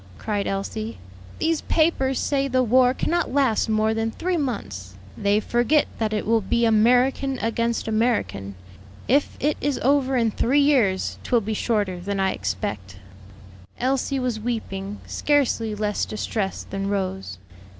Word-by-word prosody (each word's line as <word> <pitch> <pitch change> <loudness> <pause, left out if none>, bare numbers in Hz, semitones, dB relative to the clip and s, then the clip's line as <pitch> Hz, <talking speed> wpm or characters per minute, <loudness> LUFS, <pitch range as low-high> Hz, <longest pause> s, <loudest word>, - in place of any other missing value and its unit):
cried 205 -2 -2
Elsie; 215 +3 -3 0.4
"these 325 -1 0
papers 270 -5 +1
say 275 -1 0
the 255 -1 +2
war 250 +1 +4
cannot 345 +6 -1
last 260 -5 +2
more 220 0 +2
than 225 0 -1
three 360 +10 -2
months." 100 - -4 0.2
"They 200 +1 +2
forget 240 +7 +2
that 220 -1 0
it 215 - -1
will 225 0 +3
be 235 +4 +1
American 250 +4 +3
against 230 0 -1
American. 215 - 0 0.5
If 280 +4 +2
it 300 +1 0
is 290 -1 0
over 270 0 +2
in 230 -2 +2
three 255 +7 +2
years, 250 -10 +2
'twill 240 -2 +1
be 220 +1 -3
shorter 205 -5 -1
than 195 +2 -3
I 190 0 +2
expect." 95 0 -4 0.8
Elsie 270 +2 0
was 250 -4 -1
weeping, 210 -3 -4
scarcely 250 -7 +1
less 210 -1 -1
distressed 210 -2 -3
than 195 0 -2
Rose. 190 -1 -3
225 Hz, 145 wpm, -23 LUFS, 200-265 Hz, 0.8 s, war